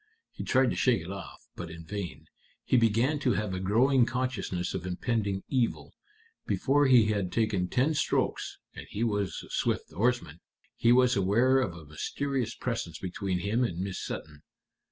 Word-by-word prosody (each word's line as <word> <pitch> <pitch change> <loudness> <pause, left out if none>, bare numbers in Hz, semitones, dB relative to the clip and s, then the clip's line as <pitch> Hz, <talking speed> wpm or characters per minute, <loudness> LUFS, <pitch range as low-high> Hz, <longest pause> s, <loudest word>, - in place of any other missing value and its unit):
He - - -7
tried 130 -1 +3
to - - -2
shake 125 -9 +2
it 90 - -7
off, 100 0 -9
but 85 - -6
in 85 0 -9
vain. 100 -1 -6 0.4
He - - +2
began 120 +5 +3
to 130 -4 +2
have 105 -1 -2
a 95 - -2
growing 120 +6 +3
consciousness 125 -8 -2
of 90 -1 -4
impending 100 +1 -1
evil. 125 -4 -1 0.5
Before 145 +1 +3
he 115 -5 +6
had 100 -4 -1
taken 105 -5 +1
ten 135 - +2
strokes 155 - -1 0.2
and - - -9
he 110 - -2
was 105 -4 -1
a - - -15
swift - - -1
oarsman 105 -5 0 0.4
he 115 - +3
was 125 0 +5
aware 115 +8 +3
of 105 -10 -1
a 80 -2 -11
mysterious 120 - -3
presence 110 -10 -3
between 90 0 -3
him 110 +6 +1
and 90 -9 -2
Miss 95 +1 -3
Sutton." 75 -1 -6
110 Hz, 175 wpm, -29 LUFS, 90-125 Hz, 0.5 s, he